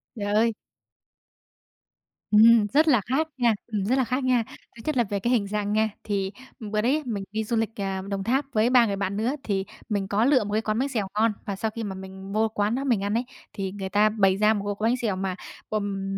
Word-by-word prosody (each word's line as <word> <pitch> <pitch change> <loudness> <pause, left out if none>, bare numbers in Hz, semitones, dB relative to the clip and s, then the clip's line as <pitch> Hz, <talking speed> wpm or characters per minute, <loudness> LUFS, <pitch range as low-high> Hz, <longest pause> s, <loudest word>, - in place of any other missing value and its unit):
Trời 205 -2 -2
ơi! 225 +2 +3 1.8
Ừm, 220 0 +7
rất 310 +3 +5
là 250 -8 +5
khác 270 +10 0
nha, 240 -3 +3
ừm, 210 -4 -2
rất 245 +6 +2
là 265 - +3
khác 255 +2 -1
nha. 250 -2 +3 0.3
Thứ 230 - -11
nhất 305 -3 -1
là 240 - +4
về 200 -2 -3
cái 235 +5 0
hình 210 -5 +1
dạng 205 0 -2
nha. 220 +1 +2
Thì 195 -2 -2 0.3
bữa 215 -2 -2
đấy 275 +7 +1
mình 210 -5 -3
đi 220 +1 -1
du 225 +2 -2
lịch, 225 -1 +1
ờ, 195 -2 -3
Đồng 195 -1 -2
Tháp 265 +7 +1
với 220 +2 +3
3 250 -2 +6
người 200 -3 -1
bạn 200 0 -2
nữa, 235 +6 0
thì 195 -2 -1 0.2
mình 200 -3 -1
có 205 +4 +2
lựa 265 -3 +4
một 205 - -5
cái 215 - +2
quán 215 0 -1
bánh 275 +2 0
xèo 220 -7 -2
ngon. 220 +1 +3
Và 200 - -3
sau 220 +3 -2
khi 230 - -3
mà 200 -3 -4
mình 190 +1 -9
vô 220 +1 +2
quán 210 +1 0
đó 270 - -2
mình 235 -8 +1
ăn 205 +1 -1
ấy, 235 +3 0 0.3
thì 195 -1 -3
người 195 -1 -5
ta 210 +2 +4
bày 195 -3 +2
ra 215 +1 +4
một 205 -2 -3
cái 220 +2 +2
bánh 250 - +1
xèo 225 -6 -1
mà, 190 -1 -2 0.3
ừm, 195 -2 -2
215 Hz, 250 wpm, -25 LUFS, 200-235 Hz, 1.8 s, Ừm